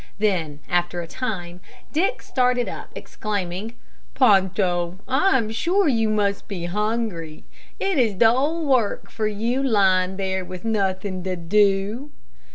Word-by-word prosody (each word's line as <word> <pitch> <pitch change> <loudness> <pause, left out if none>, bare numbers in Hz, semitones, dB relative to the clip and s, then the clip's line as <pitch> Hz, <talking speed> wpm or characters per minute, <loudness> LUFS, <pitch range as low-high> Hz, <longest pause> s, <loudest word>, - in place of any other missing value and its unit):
Then, 170 -8 -1
after 175 0 0
a - - -6
time, 180 -5 -5 0.3
Dick 335 +6 0
started 250 -1 +1
up, - - -7
exclaiming, 205 +1 -4 0.4
"Ponto, 190 -6 +2
I 270 +6 +3
am 220 -3 -2
sure 345 - +1
you 225 -5 +2
must 205 -2 0
be 180 -5 -5
hungry; 210 -5 -2 0.4
it 390 -6 +1
is 225 -5 +2
dull 270 - +3
work 255 -7 +1
for 215 -1 -1
you 230 +5 -1
lying 190 -6 +2
there 190 -1 -1
with 180 +2 -9
nothing 195 -3 -1
to 185 -1 -1
do." 200 - +1
205 Hz, 135 wpm, -23 LUFS, 185-235 Hz, 0.4 s, I